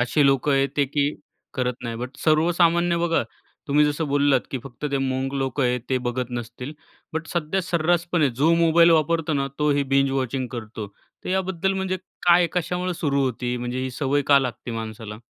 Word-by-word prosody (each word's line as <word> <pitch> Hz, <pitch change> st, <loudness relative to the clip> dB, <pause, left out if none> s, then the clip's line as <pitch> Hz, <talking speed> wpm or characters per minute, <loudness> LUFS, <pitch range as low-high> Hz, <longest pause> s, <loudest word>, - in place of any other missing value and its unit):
अशी 140 Hz, +4 st, +2 dB
लोकं 135 Hz, +1 st, +2 dB
आहेत 135 Hz, 0 st, +2 dB
ते, 145 Hz, -, +3 dB
की 145 Hz, +2 st, 0 dB, 0.4 s
करत 125 Hz, -2 st, -1 dB
नाहीत. 115 Hz, -1 st, -4 dB
बट 125 Hz, +3 st, -6 dB
सर्वसामान्य 170 Hz, +2 st, +3 dB
बघा, 170 Hz, -1 st, +1 dB, 0.5 s
तुम्ही 150 Hz, +1 st, +4 dB
जसं 150 Hz, +2 st, -1 dB
बोललात, 140 Hz, -2 st, +3 dB
की 135 Hz, -, -2 dB
फक्त 135 Hz, +2 st, -10 dB
ते 140 Hz, -, +1 dB
मंक 135 Hz, +1 st, -2 dB
लोक 135 Hz, +1 st, -2 dB
आहेत, 125 Hz, -1 st, +1 dB
ते 130 Hz, -, +2 dB
बघत 125 Hz, 0 st, -3 dB
नसतील. 120 Hz, +3 st, -6 dB, 0.4 s
बट 160 Hz, +1 st, -3 dB
सध्या 175 Hz, +3 st, -1 dB
सर्रासपणे 170 Hz, -2 st, +1 dB
जो 140 Hz, +7 st, +2 dB
मोबाईल 170 Hz, 0 st, +5 dB
वापरतो 160 Hz, 0 st, +2 dB
ना, 135 Hz, -1 st, 0 dB
तोही 145 Hz, -1 st, +2 dB
बिंज 135 Hz, 0 st, +3 dB
वॉचिंग 130 Hz, -1 st, -1 dB
करतो. 110 Hz, -3 st, -6 dB, 0.4 s
तर -, -, -5 dB
याबद्दल, 190 Hz, 0 st, 0 dB
म्हणजे 190 Hz, -1 st, -1 dB, 0.3 s
काय, 175 Hz, 0 st, +6 dB
कशामुळे 180 Hz, +1 st, -1 dB
सुरू 140 Hz, -4 st, 0 dB
होते? 125 Hz, 0 st, -2 dB
म्हणजे 125 Hz, +1 st, -4 dB
ही 130 Hz, -, -3 dB
सवय 145 Hz, +2 st, 0 dB
का 140 Hz, -, +8 dB
लागते 125 Hz, -2 st, -4 dB
माणसाला? 110 Hz, -1 st, -6 dB
140 Hz, 180 wpm, -23 LUFS, 130-165 Hz, 0.5 s, का